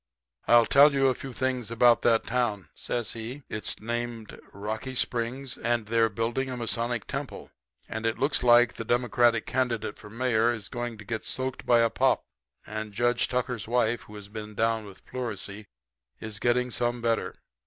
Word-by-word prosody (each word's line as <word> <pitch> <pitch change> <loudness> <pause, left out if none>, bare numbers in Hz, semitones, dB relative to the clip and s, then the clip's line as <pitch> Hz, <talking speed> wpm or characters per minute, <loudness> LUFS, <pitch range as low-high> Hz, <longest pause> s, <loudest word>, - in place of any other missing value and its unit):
"'I'll 120 -1 +7
tell 140 +4 +6
you 135 -1 +4
a - - +2
few 135 +2 -8
things 125 -2 -2
about 115 +1 +5
that 115 -1 +3
town,' 110 - -1
says 120 -3 -3
he. 120 +5 -7
'It's 105 - -3
named 120 0 -4
Rocky 110 +6 -5
Springs, 125 +2 -2
and 120 -1 0
they're 115 +1 +2
building 115 +5 -2
a 125 - -4
Masonic 120 -1 -1
temple, - - -6 0.4
and 110 0 -5
it 115 0 0
looks 140 +4 +2
like 120 0 +6
the - - -3
Democratic 120 -1 +2
candidate 120 -5 -1
for 105 - -11
mayor 120 0 +2
is 105 -4 -8
going 120 -2 -4
to 105 - -11
get 110 +1 -3
soaked 130 0 -3
by 120 -1 +5
a 115 - +3
Pop, - - +2 0.4
and 110 -1 -5
Judge 120 +3 +2
Tucker's 125 -4 -2
wife, 120 -1 +1
who 105 - -12
has 105 -1 -9
been 105 0 -8
down 115 0 +1
with 100 -2 -13
pleurisy, 110 -4 -5 0.5
is 110 -1 -6
getting 125 +2 +1
some 120 +1 0
better. 115 -5 -1
115 Hz, 175 wpm, -27 LUFS, 110-125 Hz, 0.5 s, I'll